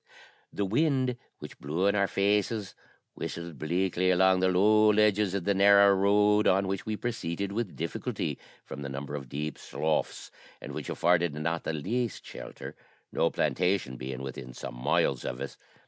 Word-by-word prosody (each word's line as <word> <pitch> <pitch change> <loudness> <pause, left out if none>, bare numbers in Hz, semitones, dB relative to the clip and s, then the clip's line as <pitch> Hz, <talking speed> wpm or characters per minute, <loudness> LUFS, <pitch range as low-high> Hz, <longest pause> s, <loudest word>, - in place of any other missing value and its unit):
The 100 - -2
wind, 130 +2 +1 0.2
which - - -11
blew 80 +7 -1
in 100 - +4
our 100 -1 +2
faces, 100 +1 0 0.4
whistled 85 -4 -6
bleakly 90 +3 0
along 95 +1 +4
the 95 - +3
low 105 +4 +5
hedges 105 -2 +2
of 100 - -2
the 100 - +2
narrow 100 0 +6
road, 105 +2 +3
on 95 +1 +3
which 95 +1 -3
we 110 -1 -2
proceeded 100 -5 -3
with 110 -2 -3
difficulty 85 +1 -3 0.3
from 70 - -8
the 70 - -5
number 70 +1 -6
of 70 -3 -6
deep 75 +3 -4
sloughs, 80 0 -2 0.3
and - - -8
which - - -6
afforded 85 -3 +2
not 85 +2 -2
the - - -1
least 115 +9 -2
shelter, - - -9 0.4
no - - +2
plantation 90 -7 0
being 65 +1 -6
within 65 -2 -7
some - - -7
miles - - +1
of 60 - -4
us. 70 - -6
95 Hz, 165 wpm, -28 LUFS, 75-105 Hz, 0.4 s, narrow